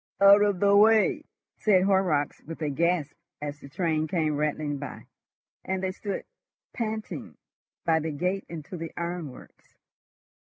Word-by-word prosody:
"Out 200 +1 +8
of 205 -3 +2
the 200 +1 +4
way," 215 +1 +5 0.3
said 190 -4 +4
Horrocks, 190 -7 +1
with 165 +1 -9
a 150 - 0
gasp, 170 0 +1 0.3
as 145 0 -5
the 140 - -12
train 160 0 0
came 155 -2 0
rattling 150 -1 -1
by, 140 -2 -8 0.6
and 190 0 -2
they 190 - 0
stood 200 +1 -5 0.5
panting 220 -2 -4 0.5
by 165 -1 +3
the 160 +1 -3
gate 180 +6 -2
into 165 +2 -7
the 165 -1 -6
ironworks. 170 -6 -7
170 Hz, 140 wpm, -27 LUFS, 150-195 Hz, 0.6 s, Out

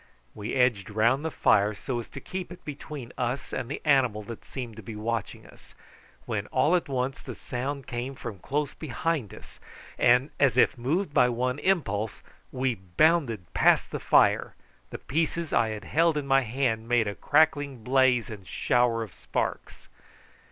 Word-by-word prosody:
We 105 +2 -5
edged 125 -7 +2
round 115 +7 +2
the 160 - -1
fire 105 -7 +3
so 120 +5 -3
as 115 - -8
to - - -8
keep 185 -2 -6
it 180 - -12
between 145 -3 -7
us 125 +2 -2
and 120 - -3
the 145 - -5
animal 130 -7 +3
that 115 +2 -9
seemed 120 -5 -7
to - - -7
be 110 +2 -8
watching 110 0 -3
us, - - -18 0.5
when - - -3
all 170 - +2
at 175 - -1
once 130 0 -2
the - - -8
sound 135 +2 -4
came 125 +2 -4
from 115 -6 -7
close 145 +7 -2
behind 150 - -2
us, - - -13 0.4
and, 125 +4 +4
as 135 -4 +3
if 130 - +5
moved 145 +8 -1
by 125 -3 +5
one 125 +3 -1
impulse, 110 - -1 0.3
we 130 -1 0
bounded 115 - +1
past - - +3
the - - -3
fire, - - +3 0.3
the - - -6
pieces 165 +2 -2
I 115 - +3
had 105 -2 -5
held 165 - +2
in 145 - -2
my 135 0 +4
hand 115 -2 -1
making 115 -4 +2
a - - -7
crackling 145 -6 +2
blaze 125 -2 +3
and 100 -4 -9
shower 120 -2 +1
of 105 - -10
sparks. - - -4
125 Hz, 175 wpm, -27 LUFS, 115-145 Hz, 0.5 s, if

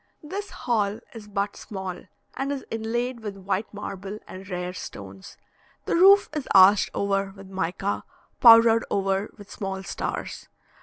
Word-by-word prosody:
This 395 +7 -5
hall 220 -4 -1
is 220 -3 -10
but 200 0 -2
small, 190 -3 -7 0.3
and 275 +1 -3
is 280 -2 -4
inlaid 235 +2 -2
with 205 -3 -6
white 195 +2 -3
marble 200 0 -6
and 190 +1 -10
rare 180 -1 -4
stones; 95 - -10 0.5
the - - -1
roof 395 +3 +7
is 300 -4 -4
arched 195 +2 +7
over 195 -1 0
with 195 -1 -12
mica, 190 +2 -2 0.4
powdered 230 -1 +8
over 195 +1 0
with 205 -1 -13
small 195 -1 -5
stars. - - -5
200 Hz, 145 wpm, -25 LUFS, 190-230 Hz, 0.5 s, powdered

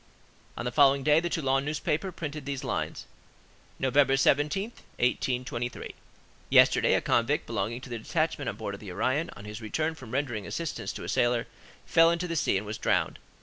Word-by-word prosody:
On 120 - -4
the 125 - -1
following 140 0 +5
day 150 +2 +5
the 175 +1 -2
Toulon 135 -4 +1
newspaper 155 +5 -1
printed 150 -4 -6
these 140 -2 -3
lines:— - - -3 0.7
"Nov. 130 -1 -1
17, 145 +5 +3 0.3
1823. 125 -1 -1 0.6
Yesterday, - - +5
a - - +2
convict - - +1
belonging 115 +3 -3
to 135 - -10
the 120 - -3
detachment 155 +2 -1
on 105 - -5
board 105 -2 -5
of 100 - -7
the 100 -3 -8
Orion, 130 - 0
on 105 0 -11
his 105 +2 -7
return 155 +9 -1
from 130 -7 -12
rendering 120 -5 -2
assistance 170 -2 -4
to - - -7
a - - -6
sailor, 120 -1 +1 0.4
fell 165 0 +5
into 170 +1 -1
the 165 - -3
sea 125 - +2
and 100 - -4
was 105 +1 -5
drowned. - - 0
135 Hz, 185 wpm, -28 LUFS, 120-155 Hz, 0.7 s, following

